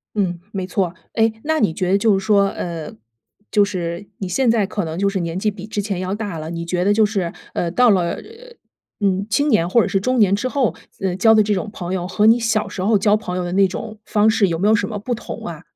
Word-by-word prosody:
嗯， 180 -4 0
没 190 -2 -2
错。 185 -1 -1 0.2
哎， 225 -1 +3
那 315 +1 0
你 200 - +2
觉 185 +2 -1
得 195 - +5
就 205 -1 +3
是 195 - -5
说， 200 -2 +4
呃， 165 -3 -5 0.6
就 205 -2 +4
是 180 -1 -4
你 190 -2 -4
现 260 +3 +2
在 225 -3 +3
可 205 -2 -3
能 160 +1 -5
就 200 +1 +2
是 195 -1 -2
年 170 0 -3
纪 210 +2 0
比 200 +1 -9
之 210 -1 -2
前 195 -3 -3
要 185 +2 -2
大 205 -6 -4
了， 155 +1 -6
你 170 0 -5
觉 180 +1 -1
得 205 - +4
就 220 0 +4
是， 195 -5 -2 0.2
呃， 170 - -1
到 245 +7 +4
了 180 -5 +2
呃 - - -3
呃 470 +2 -15 0.5
嗯， 195 0 +1
青 285 +7 +2
年 175 -8 +2
或 235 +5 +4
者 - - 0
是 195 - +1
中 255 +5 0
年 200 -4 +4
之 205 +6 0
后， 255 - 0 0.3
嗯， 185 -1 -1
交 220 +3 +5
的 215 -1 +5
这 210 - 0
种 200 +2 -2
朋 185 -3 -5
友 180 -1 -2
和 195 +3 +1
你 230 +2 +6
小 225 -2 0
时 185 - -6
候 210 +2 +3
交 205 +2 +3
朋 180 -4 -5
友 180 - -1
的 175 - -4
那 195 +1 +4
种 215 +3 -7
方 215 0 +3
式 215 -2 +3
有 165 -2 -1
没 200 +5 +2
有 220 - +5
什 230 - 0
么 215 - -4
不 225 +5 -3
同 235 - -7
啊？ - - -7
200 Hz, 295 characters per minute, -20 LUFS, 180-220 Hz, 0.6 s, 你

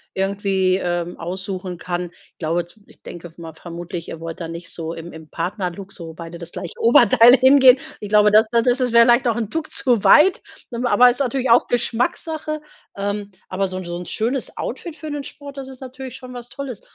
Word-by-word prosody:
irgendwie, 195 -1 +1
ähm, 175 -1 -2
aussuchen 185 +1 -5
kann. 175 0 -4
Ich - - -26
glaube 170 +1 -1
z 175 - -20
ich - - -22
denke 175 -1 -10
mal 165 -2 -9
vermutlich, 170 +1 -8
ihr 165 - -7
wollt 165 +1 -7
da 165 - -5
nicht 170 +1 -7
so 165 -1 -5
im 165 +1 -9
im 160 -1 -12
Partnerlook, 185 +1 -4
so 165 -2 -8
beide 170 +1 -9
das 170 0 -9
gleiche 175 - -7
Oberteil 240 +1 +7
hingehen. 260 0 +7 0.2
Ich 210 - -6
glaube, 210 0 +5
das 215 +2 +6
das 235 -1 +3
das 250 0 +1
wäre 235 0 +7
vielleicht 240 +2 +4
auch 230 - -1
'n 225 -3 -2
Tuck 320 +3 -4
zu 240 -6 +2
weit. 365 +5 +6 0.3
Ähm, 235 +2 -2
aber 245 +1 +6
ist 245 +3 -1
natürlich 265 -1 -1
auch 235 +1 +5
Geschmackssache. 305 +6 -1 0.4
Ähm, 205 0 -3 0.2
aber 190 +1 -2
so' 185 - -5
n 185 - -6
so 175 0 -5
'n 180 - -7
schönes 240 +7 -2
Outfit 335 -3 -6
für 310 +1 -7
den 290 -1 -4
Sport, 285 0 -11
das 270 -1 -7
ist 260 -1 -12
natürlich 260 0 -8
schon 255 -1 -11
was 245 -1 -9
Tolles. 270 -7 -7
205 Hz, 210 wpm, -21 LUFS, 175-250 Hz, 0.4 s, Oberteil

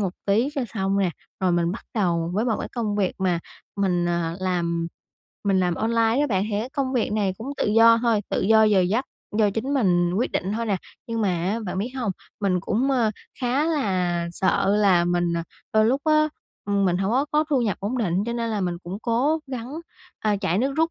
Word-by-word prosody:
một 190 -3 -1
tí 220 +7 +3
cho 275 - 0
xong 195 0 0
nè, 185 -3 +2 0.3
rồi 185 -2 +2
mình 170 0 +1
bắt 220 - -8
đầu 170 -5 +1
với 215 - +1
một 230 -3 +1
cái - - -4
công 215 -4 -1
việc 195 -3 0
mà 180 -3 +1 0.4
mình, 180 -3 +1
à, 170 -1 -1
làm 170 -2 -1 0.6
mình 195 -2 +3
làm 175 -1 +1
online 230 - +2
á 295 - +2
bạn. 190 -3 +1
Thì 205 - 0
cái 250 +4 -5
công 270 -2 -2
việc 235 -4 0
này 200 -3 0
cũng 240 +5 -6
tự - - 0
do 230 0 +7
thôi, 230 -3 +3
tự - - 0
do 220 +2 +5
giờ 210 -3 +4
giấc, 210 +9 +1 0.3
do 210 -2 +4
chính 240 +8 -2
mình 175 -7 +2
quyết 230 +6 0
định 190 +3 -1
thôi 230 +1 -2
nè. 200 - +1 0.3
Nhưng 230 -1 -2
mà 200 - +2
á 185 +6 -1
bạn 185 - -3
biết 225 +6 -2
hông? 230 -7 -1 0.3
Mình 185 -3 +1
cũng, 250 +10 0
ơ, 240 -5 +2 0.3
khá 255 +4 +1
là 185 - 0
sợ 195 +2 +2
là 190 -5 +4
mình, 175 -1 +1
à, 170 - -1 0.3
đôi 215 0 +4
lúc 265 +5 +2
á, 305 0 +4 0.4
ừm, 200 -1 +1
mình 180 -1 +2
hổng 195 +2 0
có 265 +3 +3
có 300 +1 +3
thu 265 -4 +3
nhập 210 -5 0
ổn 230 +6 -2
định 185 -7 0
cho 235 - -1
nên 230 -1 -2
là 215 -2 -1
mình 175 -2 -1
cũng 185 +4 -6
cố 255 +7 +1
gắng, 255 -1 -6 0.5
à, 210 -1 +1
chạy 190 -2 0
nước 265 +4 +1
rút 325 +1 +2
205 Hz, 235 wpm, -24 LUFS, 185-235 Hz, 0.6 s, do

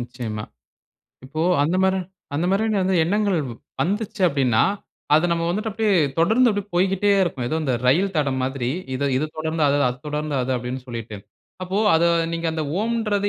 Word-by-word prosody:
நிச்சயமா. 120 -3 -5 0.8
இப்போ 150 +4 -5 0.2
அந்த 165 +5 +1
மாரி 190 0 +2 0.4
அந்த 165 +5 0
மாரியான 210 +1 +1
வந்து 185 0 +1
எண்ணங்கள் 200 +1 +1
வ் 120 - -7 0.3
வந்துச்சு 210 +2 -2
அப்படீன்னா, 130 -8 +2 0.5
அதை 155 +3 +4
நம்ம 170 0 -1
வந்துட்டு 215 +5 -2
அப்படியே 215 0 0 0.3
தொடர்ந்து 220 +9 +4
அப்படியே 205 -1 -3
போய்க்கிட்டே 195 +3 +2
இருக்கும். 135 -9 -2
ஏதோ 160 - -1
இந்த 130 -4 0
ரயில் 185 +9 +3
தடம் 135 -3 0
மாதிரி. 130 -2 -2 0.3
"இதை 140 +2 -1
இதை 145 +4 0
தொடர்ந்து 160 0 -1
அதை 140 +1 +2
அதை 125 +1 -5
தொடர்ந்து 150 0 -3
அது." 125 +1 -2
அப்படீன்னு 125 +2 -5
சொல்லிட்டு. 115 -3 -6 0.5
அப்போ 185 +2 -2 0.2
அதை 170 +1 +4 0.2
நீங்க, 165 0 -2
"அந்த 160 -1 -2 0.2
ஓம்ன்றது 215 -3 0
165 Hz, 170 wpm, -22 LUFS, 135-200 Hz, 0.8 s, அதை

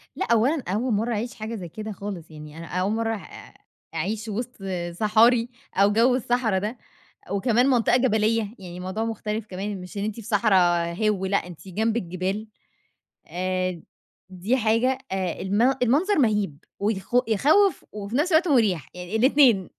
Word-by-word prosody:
لأ - - -1
أولًا 255 +6 +3
أول 220 +6 0
مَرّة 225 +4 0
أعيش 230 +3 -3
حاجة 220 +1 -5
زي 180 -5 -7
كده 215 +5 -6
خالص، 195 -5 -7
يعني 150 0 -11
أنا 165 - -7
أول 185 +4 -1
مَرّة 225 0 0
أع 205 - -11 0.4
أعيش 205 +7 -2
وسط 240 +4 -4 0.3
صحاري 225 +5 +3 0.3
أو 200 +1 +4
جوّ 240 +4 +4
الصحرا 240 -5 +1
ده، 215 +5 -4 0.5
وكمان 235 +5 +2
منطقة 245 -3 +3
جبلية، 220 -3 +1
يعني 180 -2 -9
الموضوع 185 +5 -3
مختلف 220 -1 -3
كمان، 195 0 -5
مش 180 +3 -8
إن 200 - -1
أنتِ 215 0 -2
في 230 - -8
صحرا 210 -1 +2 0.4
هِوّ 205 -1 0
لأ، 200 +1 +2
أنتِ 180 +2 -11
جنب 220 +5 0
الجبال، 190 +2 -3 0.8
آآ، 185 -1 -2 0.5
دي 190 +7 -1
حاجة 235 +3 +2
آآ، 190 -2 -2
الم 200 +3 0 0.2
المنظر 310 - +2
مَهيب 210 - +1 0.2
ويخ 200 -2 -2 0.2
يخوّف 310 - +3
وفي 205 +2 -6
نفس 305 +7 +1
الوقت 330 +3 +4
مُريح 210 - +2
يعني 180 +3 -6
الاتنين. 245 -5 +4
215 Hz, 160 wpm, -24 LUFS, 190-235 Hz, 0.8 s, أو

